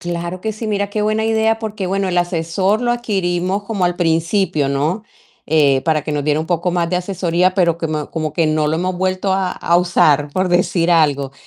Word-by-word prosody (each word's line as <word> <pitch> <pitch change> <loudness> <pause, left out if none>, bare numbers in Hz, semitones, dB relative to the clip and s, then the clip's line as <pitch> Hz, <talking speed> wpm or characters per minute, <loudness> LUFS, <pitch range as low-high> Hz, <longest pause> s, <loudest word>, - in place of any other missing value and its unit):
Claro 175 +1 -5
que 220 - -2
sí, 215 +2 -6
mira 205 -1 -1
qué 210 - -2
buena 215 +1 0
idea, 225 0 +1
porque 215 -3 -4
bueno, 195 +1 -1
el 180 -1 +1
asesor 175 +5 0
lo 240 0 +1
adquirimos 190 -4 -1
como 200 -4 -1
al 175 0 -2
principio, 165 -2 +1
¿no?, 150 +10 -1 0.4
eh, 145 -3 +3
para 155 -2 +1
que 155 - -5
nos 145 -1 -1
diera 150 0 +1
un - - -3
poco 175 +1 0
más 170 -1 0
de 180 - +1
asesoría, 180 -1 0
pero 170 -3 +2
como 155 -2 -3
como 155 -2 -3
que 165 -2 +2
no 155 0 +1
lo 155 +1 0
hemos 180 +2 -2
vuelto 185 +1 0
a, 190 -1 0
a 170 - +1
usar, 150 -5 +2
por 185 +2 0
decir 175 -1 +1
algo, 145 -5 +2
175 Hz, 215 wpm, -18 LUFS, 160-195 Hz, 0.4 s, eh